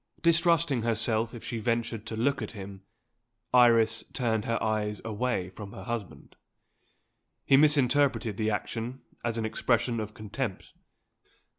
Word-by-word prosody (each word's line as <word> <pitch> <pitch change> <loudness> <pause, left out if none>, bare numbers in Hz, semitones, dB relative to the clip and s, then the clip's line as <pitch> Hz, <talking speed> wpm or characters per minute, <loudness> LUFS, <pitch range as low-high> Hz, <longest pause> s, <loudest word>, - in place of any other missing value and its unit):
Distrusting 165 -6 +3
herself 115 0 +1
if 115 - -9
she 115 - -4
ventured 115 -1 -2
to 110 - -4
look 135 +4 +1
at 110 - -5
him, 95 -2 -9 0.7
Iris 115 -2 +5
turned 110 -4 0
her 115 0 0
eyes 105 -1 -1
away 110 -4 -2
from 100 +1 -9
her 95 - -8
husband. 115 -4 -6 1.1
He 135 - +5
misinterpreted 140 -6 +3
the 110 +1 0
action 115 +4 -4 0.2
as 120 -1 -1
an 110 - -1
expression 115 +1 0
of 105 -1 -5
contempt. 105 -2 -5
115 Hz, 135 wpm, -28 LUFS, 110-125 Hz, 1.1 s, Iris